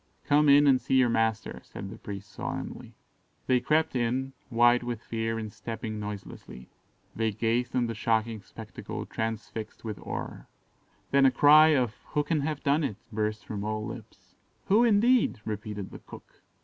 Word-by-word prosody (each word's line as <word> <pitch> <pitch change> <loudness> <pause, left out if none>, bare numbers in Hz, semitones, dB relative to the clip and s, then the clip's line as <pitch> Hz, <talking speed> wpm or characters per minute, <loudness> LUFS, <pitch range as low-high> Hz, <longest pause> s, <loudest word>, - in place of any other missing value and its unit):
"Come 150 0 +4
in 145 +1 +7
and 135 -3 +5
see - - 0
your 130 -2 +5
master," 115 -1 0
said 95 0 -8
the - - -9
priest 100 0 -8
solemnly. - - -6 0.5
They 130 -1 +3
crept 155 +4 +1
in, 130 +2 -1 0.2
white 120 0 +4
with 120 -2 -3
fear 115 0 -2
and 110 -2 -5
stepping 110 -1 -5
noiselessly. 100 -11 -8 0.4
They 110 0 0
gazed 115 +4 -1
on 125 -1 +2
the 115 - -3
shocking 110 0 0
spectacle - - -8
transfixed 110 0 -5
with 105 -3 -5
horror. - - -6 0.6
Then 140 0 +6
a - - +4
cry 155 +3 +7
of 125 -5 +1 0.2
"Who 150 - +2
can 160 0 0
have 150 0 -3
done 150 +2 +2
it?" 115 -8 -2
burst 105 0 -2
from 100 -2 -5
all 110 0 -2
lips. - - -10 0.4
"Who, 215 +5 +5
indeed?" 235 - +3
repeated 105 -2 -5
the - - -9
cook. - - -14
115 Hz, 165 wpm, -28 LUFS, 110-140 Hz, 0.6 s, in